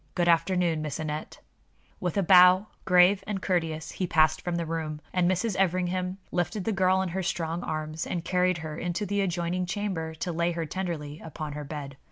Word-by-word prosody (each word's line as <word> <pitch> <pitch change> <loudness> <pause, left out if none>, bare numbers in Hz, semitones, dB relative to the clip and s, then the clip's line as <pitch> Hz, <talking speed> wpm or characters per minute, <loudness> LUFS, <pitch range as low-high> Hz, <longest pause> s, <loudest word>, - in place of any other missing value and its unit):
Good 175 -1 +1
afternoon, 170 -1 +2
Miss 155 0 -4
Aneth." 155 -1 -4 0.6
With 180 +1 -2
a 200 - +3
bow, 180 +2 +7 0.2
grave 185 +2 +5
and 205 -2 -2
courteous, 165 -4 -1
he 185 - -2
passed 155 -1 +3
from 175 -1 -2
the 170 -1 -1
room, 160 -2 -3
and 180 -1 +3
Mrs. 185 +3 0
Everingham 185 0 0
lifted 180 +3 -1
the 225 - 0
girl 190 -1 +3
in 185 - -3
her 190 +3 -2
strong 165 -1 -2
arms 155 +1 -4
and 170 -1 -3
carried 180 -1 +2
her 155 -1 -5
into 175 +5 -2
the 205 0 0
adjoining 180 -1 -1
chamber 180 -5 -3
to 175 +3 -3
lay 170 +1 0
her 165 -1 -2
tenderly 160 -3 -4
upon 155 -2 -6
her 150 0 -5
bed. 140 -2 -7
175 Hz, 195 wpm, -27 LUFS, 160-185 Hz, 0.6 s, bow